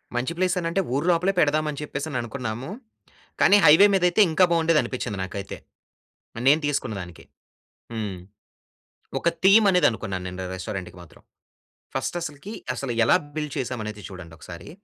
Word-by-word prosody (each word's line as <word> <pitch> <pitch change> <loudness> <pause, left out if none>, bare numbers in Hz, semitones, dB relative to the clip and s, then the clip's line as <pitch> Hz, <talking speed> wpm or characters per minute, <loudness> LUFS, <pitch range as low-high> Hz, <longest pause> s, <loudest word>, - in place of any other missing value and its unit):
మంచి 125 +7 -1
ప్లేసనంటే, 180 0 0
ఊరు 145 +4 -1
లోపలే 180 +3 +1
పెడదాం 155 0 +2
అని 145 - -7
చెప్పేసి 145 0 -5
అని 130 - -2
అనుకున్నాము. 120 +2 -5 0.7
కానీ 200 - +6
హైవే 165 +7 +8
మీదైయితే 180 +1 +2
ఇంకా 180 +4 +4
బాగుండేది 165 -2 +3
అనిపిచ్చింది 105 -6 -4
నాకైతే. 100 +1 -6 0.8
మరినేను 140 +6 +3
తీసుకున్న 125 -6 -2
దానికి. 85 -2 -12 0.7
హ్మ్. 105 -4 -4 1.0
ఒక - - -2 0.2
థీమ్ 205 +3 +7
అనేది 180 -5 +4
అనుకున్నాను 95 -4 -5
నేను 90 0 -7
ర - - -5
రెస్టారెంట్‌కి 95 -2 -6
మాత్రం. 85 -4 -17 0.7
ఫస్ట్ - - -3
అసలకి, 155 +5 -7 0.2
అసల 130 0 -4
ఎలా 115 - +5 0.2
బిల్డ్ 150 -2 -3
చేసాం 130 -3 -3
అనేది 105 -1 -7
చూడండి 90 -4 -10
ఒకసారి. 85 +1 -11
140 Hz, 150 wpm, -24 LUFS, 105-165 Hz, 1.0 s, హైవే